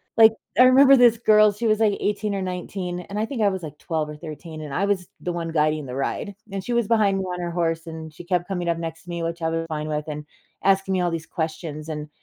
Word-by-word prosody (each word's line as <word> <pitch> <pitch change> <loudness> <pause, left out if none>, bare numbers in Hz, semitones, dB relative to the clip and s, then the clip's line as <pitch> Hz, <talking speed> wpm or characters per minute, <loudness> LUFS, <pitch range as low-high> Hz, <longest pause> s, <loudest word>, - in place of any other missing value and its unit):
Like, 220 -1 +8 0.3
I - - +10
remember 265 +2 +8
this 240 -3 +6
girl. 215 -2 +5
She 210 +4 -5
was, 215 -1 +3
like, 215 -2 +3
18 210 0 -1
or 195 - -2
19, 180 0 -4
and 200 +3 -7
I 215 - +1
think 240 -1 -4
I 205 - +5
was, 190 -2 -4
like, 150 -1 -8
12 155 -2 -2
or 150 - -7
13. 155 0 -8
And 150 -2 -7
I 195 - +1
was 195 -3 0
the 180 - -3
one 170 -1 -3
guiding 155 -1 +1
the 125 -1 -6
ride. 140 +8 -3 0.2
And 195 -1 -4
she 245 - -3
was 235 -3 +1
behind 210 -4 +3
me 190 - -1
on 180 -1 -4
her 175 - -2
horse, 165 -1 -1
and 160 -1 -7
she 175 +3 -10
kept 175 -1 0
coming 180 -3 -2
up 170 - +1
next 165 -1 -6
to 175 - -14
me, 170 -1 -3
which 165 +1 -3
I 160 - +1
was 165 0 -2
fine 155 -1 -3
with, 150 -1 -2
and 150 -1 -5 0.4
asking 195 0 +3
me 185 - +1
all 175 - +1
these 165 -1 -4
questions. 160 -1 -4
And 150 -1 -5
175 Hz, 275 wpm, -24 LUFS, 160-200 Hz, 0.4 s, I